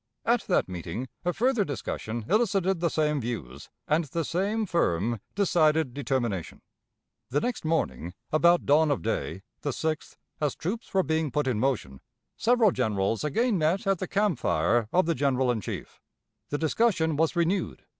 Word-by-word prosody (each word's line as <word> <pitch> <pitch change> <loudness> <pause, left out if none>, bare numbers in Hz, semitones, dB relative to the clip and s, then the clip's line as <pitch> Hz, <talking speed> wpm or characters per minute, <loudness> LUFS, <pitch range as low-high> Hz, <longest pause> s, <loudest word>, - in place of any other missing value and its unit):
At 235 0 +3
that 180 - +2
meeting 90 +7 -5
a 175 - +1
further 240 +3 +2
discussion 120 - -4
elicited 195 -4 +2
the 170 0 +1
same 150 -3 +1
views, 70 - -6 0.2
and 155 +2 +2
the 165 +3 -3
same 205 +7 0
firm, 115 - 0 0.2
decided 160 -8 +2
determination. 120 - -2 0.7
The 140 +4 +1
next 245 +8 -2
morning, 90 - -1 0.2
about 170 +3 +4
dawn 150 +2 +4
of 145 - 0
day, 95 -4 -2 0.2
the 145 - -2
6th, 155 +3 -3 0.2
as 150 -3 0
the - - -40
troops 220 +8 -3
were 190 -1 +3
being 160 -2 0
put 150 +2 0
in 125 -5 0
motion, 110 - -1 0.3
several 235 -3 +4
generals 110 -4 0
again 205 - +1
met 170 +8 +1
at 195 -2 +1
the 185 - -3
camp 200 - +1
fire 105 +9 +1
of 185 0 +3
the 165 - +1
general 130 -3 +1
in 115 -3 -2
chief. - - -7 0.5
The 145 - -1
discussion 160 -1 +1
was 160 +4 +1
renewed. 175 +3 0
155 Hz, 165 wpm, -27 LUFS, 120-185 Hz, 0.7 s, about